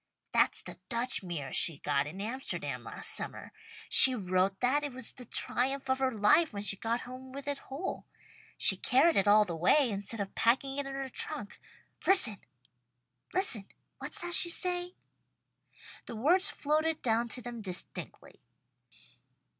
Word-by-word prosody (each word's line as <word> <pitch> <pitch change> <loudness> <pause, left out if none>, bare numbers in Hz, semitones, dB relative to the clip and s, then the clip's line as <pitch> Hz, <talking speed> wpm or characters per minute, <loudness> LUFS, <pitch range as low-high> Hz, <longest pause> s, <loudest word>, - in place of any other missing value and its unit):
"That's - - +2
the - - -9
Dutch 240 +1 0
mirror 165 -8 -7
she 160 - +6
got 140 0 -2
in 175 +6 -9
Amsterdam 250 +6 -3
last - - -2
summer. - - -4 0.4
She 260 -1 +9
wrote 190 -2 -1
that 260 +4 +1
it 290 -3 -5
was 260 -2 -3
the 250 - -12
triumph 265 +3 -1
of 260 - -1
her 265 -1 +1
life 295 +10 +2
when 200 -1 -7
she 195 -1 +2
got 230 +4 -3
home 255 +1 -11
with 280 +1 -9
it 285 -1 -3
whole. 290 +8 -6 0.5
She - - +4
carried 295 +6 +2
it 195 - +1
all 210 +1 +5
the 175 -4 -6
way, 240 - +2
instead 205 +3 -3
of 195 -1 -5
packing 270 +4 0
it 280 - -4
in 270 - -7
her 270 0 -5
trunk. 205 -5 -5 0.5
Listen! 270 - +6 0.9
What's 245 - -3
that 350 0 -5
she's 345 -1 +3
saying?" 360 -1 -3 1.1
The 235 - -7
words 350 - +3
floated 310 +2 -2
down 235 0 +1
to 250 +2 -3
them 240 -2 -8
distinctly. 185 -4 -5
250 Hz, 160 wpm, -30 LUFS, 205-280 Hz, 1.1 s, She